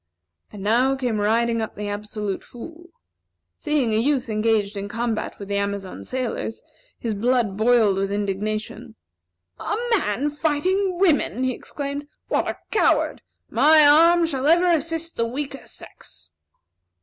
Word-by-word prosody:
And 200 -2 -9
now 245 +6 +3
came 245 -5 -2
riding 230 +2 +1
up 220 - -5
the 210 0 -5
Absolute 205 -1 -4
Fool. 330 +8 -11 0.7
Seeing 295 -8 0
a 215 - +2
youth 260 0 0
engaged 215 -1 +1
in 200 0 -4
combat 230 0 -3
with 200 - -8
the 200 0 -1
Amazon 200 -2 -3
sailors, 250 -3 -4 0.3
his 230 -2 -3
blood 230 -1 +1
boiled 220 -2 +3
with 195 0 -1
indignation. 215 +3 -3 0.6
"A - - -2 0.2
man 280 - -1
fighting 355 +6 0
women!" 320 -8 +2
he 260 - +1
exclaimed. 285 +3 -6 0.2
"What - - +1
a - - -3
coward! 440 - +2 0.3
My 300 +5 +6
arm 335 +4 +6
shall 280 -4 -1
ever 345 +3 +4
assist 330 0 -2
the 230 - +1
weaker 275 +2 -6
sex." - - -11
240 Hz, 140 wpm, -23 LUFS, 210-295 Hz, 0.7 s, My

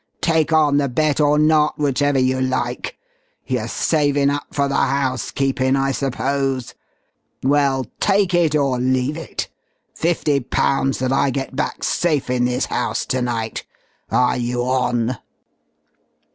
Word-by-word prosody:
Take 160 -1 +1
on 150 -3 +4
the 140 -2 +1
bet 150 +4 +1
or 150 0 +3
not, 150 0 +3
whichever 145 -1 +1
you 130 0 +1
like. 130 - -2 0.5
You're - - -2
savin' 145 -3 +1
up 145 0 -3
for 140 -1 0
the 140 - -3
housekeepin' 135 0 0
I 135 0 +1
suppose. 135 -1 -2 0.7
Well, 135 -1 +2
take 195 -2 +2
it 165 -4 +3
or 135 -4 +1
leave 130 +3 0
it 165 - -5 0.5
fifty 160 -4 0
pounds 135 +1 0
that 130 +1 -1
I 135 - +2
get 135 0 -4
back 150 - -3
safe 150 -7 0
in 125 -1 +1
this 125 0 0
house - - -2
to 130 - -1
night. 115 -2 -3 0.5
Are 125 0 +2
you 120 0 -1
on?" 125 -2 0
135 Hz, 140 wpm, -20 LUFS, 130-145 Hz, 0.7 s, on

